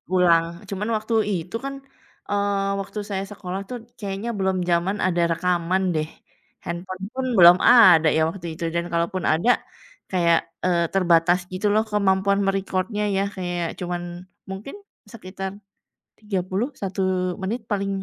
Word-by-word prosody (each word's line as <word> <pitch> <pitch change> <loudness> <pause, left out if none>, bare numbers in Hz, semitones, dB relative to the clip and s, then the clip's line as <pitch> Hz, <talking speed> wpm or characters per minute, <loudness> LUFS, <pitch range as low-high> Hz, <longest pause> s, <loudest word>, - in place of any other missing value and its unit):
ulang. 170 -2 +5 0.2
Cuman 205 +2 -3
waktu 215 +2 -4 0.2
itu 180 +2 -3
kan, 275 - -3 0.6
eee, 205 0 +1 0.3
waktu 195 +2 -6
saya 195 -1 -2
sekolah 190 -2 -5
itu 250 - -8 0.3
kayaknya 200 +2 -4
belum 190 -1 +1
zaman 175 +4 +1
ada 175 -1 +1
rekaman 180 +2 0
deh. 155 0 0 0.6
Handphone 180 +2 -6
pun 265 0 -2
belum 175 0 +9
ada 185 -10 +7
ya - - +3
waktu 175 -2 -10
itu. 170 - -7
Dan 170 0 0
kalaupun 170 +2 -1
ada 170 +10 +1 0.6
kayak, 170 -2 +3 0.3
eee, 175 -2 +2
terbatas 175 -1 +4
gitu 185 +3 -3
loh 215 - +3
kemampuan 200 -1 +2
me-record-nya 195 +2 -1
ya - - +2
kayak 175 -2 -2
cuman 175 -1 -3 0.5
mungkin 195 - -7 0.4
sekitar 190 -2 -6 0.7
30, 195 +3 -1
1 195 0 -3 0.4
menit 215 +5 -2
paling, 200 -1 0
190 Hz, 140 wpm, -23 LUFS, 175-200 Hz, 0.7 s, belum